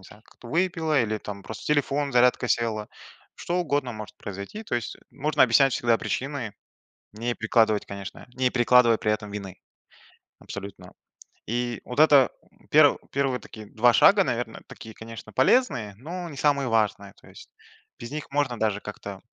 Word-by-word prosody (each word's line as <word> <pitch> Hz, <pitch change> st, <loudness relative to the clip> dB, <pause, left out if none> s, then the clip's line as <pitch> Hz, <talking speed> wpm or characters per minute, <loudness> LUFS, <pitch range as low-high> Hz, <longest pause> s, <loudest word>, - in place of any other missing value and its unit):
не 95 Hz, -, -17 dB
знаю, 105 Hz, +1 st, -16 dB
как-то 120 Hz, -, -16 dB
выпила, 160 Hz, -3 st, +1 dB
или 110 Hz, -1 st, -2 dB
там 100 Hz, -1 st, -8 dB
просто 110 Hz, 0 st, -9 dB
телефон, 145 Hz, -1 st, 0 dB
зарядка 125 Hz, 0 st, +3 dB
села, 110 Hz, -2 st, 0 dB, 0.5 s
что 175 Hz, -, -3 dB
угодно 145 Hz, -7 st, -1 dB
может 110 Hz, -1 st, -9 dB
произойти, 100 Hz, -, -7 dB
то 205 Hz, -, -4 dB
есть 120 Hz, -1 st, -3 dB
можно 150 Hz, +4 st, +1 dB
объяснять 130 Hz, +2 st, +5 dB
всегда 120 Hz, -1 st, +2 dB
причины, 130 Hz, -6 st, -4 dB, 0.6 s
не 120 Hz, +3 st, -3 dB
перекладывать, 110 Hz, -2 st, +2 dB
конечно 100 Hz, +3 st, -8 dB
не 130 Hz, 0 st, +1 dB
перекладывать 120 Hz, -1 st, +4 dB
при 105 Hz, -, +1 dB
этом 105 Hz, -1 st, -4 dB
вины 100 Hz, -2 st, -7 dB, 0.8 s
абсолютно. 100 Hz, 0 st, -9 dB, 0.5 s
И 120 Hz, 0 st, -2 dB
вот 125 Hz, +4 st, -3 dB
это 145 Hz, -4 st, +6 dB, 0.4 s
пер -, -, +6 dB
первые 135 Hz, -1 st, 0 dB
вот 125 Hz, -, -5 dB
такие 110 Hz, -1 st, -11 dB
2 120 Hz, +3 st, +3 dB
шага, -, -, +6 dB
наверное, -, -, -3 dB
такие, 110 Hz, -1 st, -11 dB
конечно, 110 Hz, -1 st, -10 dB
полезные, 130 Hz, -, +2 dB
но 170 Hz, -, -6 dB
не 145 Hz, -, -10 dB
самые 140 Hz, -2 st, +1 dB
важные, 105 Hz, -3 st, 0 dB
то -, -, -18 dB
есть 470 Hz, -, -14 dB, 0.5 s
без 115 Hz, -, -8 dB
них 150 Hz, 0 st, -6 dB
можно 140 Hz, -4 st, -1 dB
даже 105 Hz, -2 st, 0 dB
как-то, 100 Hz, -2 st, -8 dB
120 Hz, 165 wpm, -25 LUFS, 110-140 Hz, 0.8 s, это